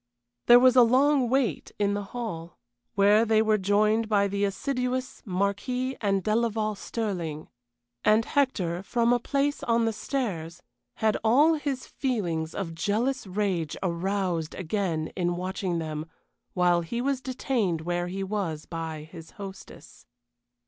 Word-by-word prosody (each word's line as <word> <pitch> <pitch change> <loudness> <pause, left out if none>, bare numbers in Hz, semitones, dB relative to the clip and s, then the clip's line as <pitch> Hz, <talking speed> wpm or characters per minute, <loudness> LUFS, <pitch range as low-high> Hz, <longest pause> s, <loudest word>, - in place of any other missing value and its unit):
There 240 - +10
was 255 0 +5
a 250 - +8
long 260 +2 +4
wait 265 -2 0
in 205 -1 +1
the 205 0 -3
hall, 195 -7 -6 0.4
where 205 +2 +5
they 220 -1 +3
were 215 -1 +3
joined 215 +3 +2
by 200 -2 +3
the 200 +1 -2
assiduous 250 +4 -2
Marquis 205 +7 -1
and 195 -3 +1
Delaval 215 -1 0
Stirling. 180 -8 -4 0.5
And 215 +1 +4
Hector, 190 - 0
from 235 +4 +1
a 245 - +2
place 280 +4 0
on 230 0 +2
the 225 - 0
stairs, 205 - -4 0.3
had 220 -1 +1
all 280 +9 +5
his 285 -4 -3
feelings 175 - -2
of 175 -5 -4
jealous 215 +9 -1
rage 185 -5 -1
aroused 180 -2 -1
again 170 -3 -2
in 175 -1 0
watching 185 0 -2
them 155 -1 -4 0.5
while 175 -1 +3
he 235 +8 -4
was 265 +1 0
detained 250 - -1
where 175 +1 -2
he 195 +2 -4
was 190 -6 -3
by 160 -2 -5
his 160 0 -11
hostess. 195 -1 -11
205 Hz, 140 wpm, -27 LUFS, 175-240 Hz, 0.5 s, There